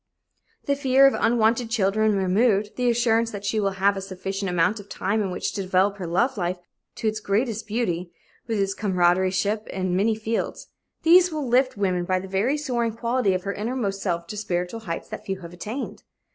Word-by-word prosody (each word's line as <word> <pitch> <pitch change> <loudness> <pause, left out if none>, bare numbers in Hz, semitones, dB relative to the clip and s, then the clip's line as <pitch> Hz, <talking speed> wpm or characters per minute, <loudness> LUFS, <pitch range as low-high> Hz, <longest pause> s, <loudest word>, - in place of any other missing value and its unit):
The 280 - +1
fear 270 -1 +4
of 275 - +6
unwanted 230 0 +2
children 215 -1 +2
removed, 200 +2 +2
the 250 -1 +1
assurance 230 -1 +2
that 205 -2 -7
she 215 +2 0
will 200 -2 0
have 200 +1 +3
a 195 - -4
sufficient 195 +1 -4
amount 180 +5 +1
of 200 0 -12
time 210 +4 -1
in 195 - -1
which 180 - -3
to 205 - -3
develop 190 +2 +1
her 180 -3 -5
love 230 +9 +1
life 180 -1 -1 0.4
to 225 - -2
its 215 0 0
greatest 215 +2 -1
beauty, 185 -6 -2 0.4
with 225 -3 -1
its 195 0 +1
comradeship 190 +2 +1
in 185 -1 -2
many 215 +4 +2
fields 220 +1 -3 0.3
these 355 +2 +6
will 305 -4 -3
lift 255 0 +2
woman 185 -3 0
by 185 +1 +1
the 190 - -8
very 205 +10 +1
soaring 240 -6 -1
quality 235 -3 +1
of 185 - -3
her 200 +1 -2
innermost 210 -3 -2
self 170 -3 -1
to 210 - -7
spiritual 185 +1 -2
heights 170 -7 -5
that - - -7
few 190 -1 -4
have 170 0 -9
attained. 215 +9 -6
205 Hz, 200 wpm, -24 LUFS, 190-230 Hz, 0.4 s, of